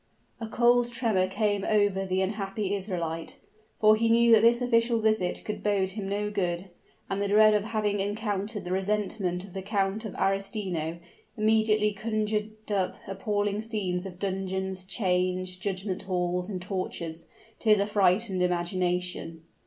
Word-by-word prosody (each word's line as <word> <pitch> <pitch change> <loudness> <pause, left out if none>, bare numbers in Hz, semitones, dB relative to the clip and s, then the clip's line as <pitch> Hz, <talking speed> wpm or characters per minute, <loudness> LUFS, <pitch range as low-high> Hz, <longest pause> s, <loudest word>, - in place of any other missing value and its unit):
A 225 - -4
cold 240 +1 +3
tremor 220 -7 +1
came 205 0 0
over 205 -2 +2
the 185 0 +1
unhappy 195 0 -2
Israelite, 170 -5 -3 0.4
for 215 0 +6
he 230 +1 +1
knew 235 +1 +5
that 220 - +7
this 235 +1 +5
official 235 -1 +2
visit 215 -5 +1
could 210 - -4
bode 195 -2 +1
him 195 -1 -5
no 210 +1 -1
good: 180 -2 -2 0.4
and 195 +1 -2
the 200 - +1
dread 215 +1 +6
of 210 -1 +1
having 210 -2 -1
encountered 205 0 -2
the 180 - -4
resentment 190 -2 -1
of 195 -2 -12
the 190 - -4
Count 200 +1 -1
of 215 - -6
Arestino, 195 -5 -1 0.4
immediately 215 -1 +3
conjured 215 0 -3
up 190 -3 0
appalling 205 +1 -1
scenes 195 -5 -2
of 180 -2 -10
dungeons, 190 -1 -3
chains, 185 -1 0
judgment 190 0 -3
halls 180 -1 -1
and 185 -3 -4
tortures, 170 -4 -5 0.3
to 225 - -1
his 210 -1 +6
affrighted 200 -1 +2
imagination. 180 -2 -1
200 Hz, 150 wpm, -28 LUFS, 185-215 Hz, 0.4 s, that